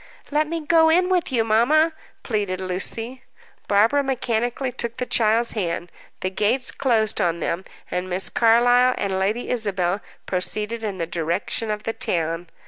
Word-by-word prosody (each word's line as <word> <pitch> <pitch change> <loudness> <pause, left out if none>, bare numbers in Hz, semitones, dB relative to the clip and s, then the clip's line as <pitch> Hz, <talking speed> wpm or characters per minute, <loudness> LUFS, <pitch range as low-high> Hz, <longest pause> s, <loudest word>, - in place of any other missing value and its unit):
"Let 300 +1 +2
me 330 +1 -3
go 320 +1 +4
in 360 +3 +3
with 360 -5 +1
you, 235 -3 +2
mamma!" 270 +9 +3 0.3
pleaded 205 -5 -2
Lucy. 225 +7 -2 0.5
Barbara 220 +8 +3
mechanically 245 -1 -1
took 235 -2 -5
the 250 - -2
child's 230 0 +2
hand. 175 -4 -3 0.3
The 185 - -2
gates 230 +7 +2
closed 225 -6 +1
on 170 -1 0
them, 175 +3 -2 0.3
and 180 +1 -2
Miss 185 +1 0
Carlyle 245 +2 +4
and 190 -2 -1
Lady 210 +6 -1
Isabel 200 -5 0 0.2
proceeded 210 +5 -1
in 205 -3 -3
the 170 - -2
direction 170 +6 -2
of 210 0 -3
the 225 - -2
town. 165 -2 -1
225 Hz, 155 wpm, -22 LUFS, 190-250 Hz, 0.5 s, go